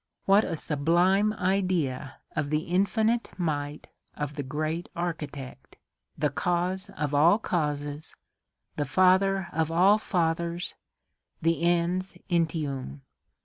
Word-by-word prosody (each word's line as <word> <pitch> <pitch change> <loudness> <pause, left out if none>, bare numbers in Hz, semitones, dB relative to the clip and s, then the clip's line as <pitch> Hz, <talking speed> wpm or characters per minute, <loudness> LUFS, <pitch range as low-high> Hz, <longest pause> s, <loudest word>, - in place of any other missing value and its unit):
What 200 +2 +5
a 165 - -2
sublime 175 +8 +2
idea 180 -9 0 0.2
of 145 - -1
the 150 +1 +1
infinite 200 +7 +1
might 150 -4 -3 0.3
of 150 -1 -4
the 145 - -4
great 155 +5 -3
Architect! 150 -6 -5 0.4
the 150 -1 +1
Cause 180 +5 -1
of 150 -1 -2
all 160 +7 +5
causes, 150 -6 -3 0.6
the 145 - 0
Father 190 +4 +3
of 160 +1 0
all 190 +6 +5
fathers, 170 -2 -1 0.7
the 165 0 +1
Ens 175 +2 +1 0.2
entium! 145 - -1
170 Hz, 110 wpm, -27 LUFS, 150-185 Hz, 0.7 s, What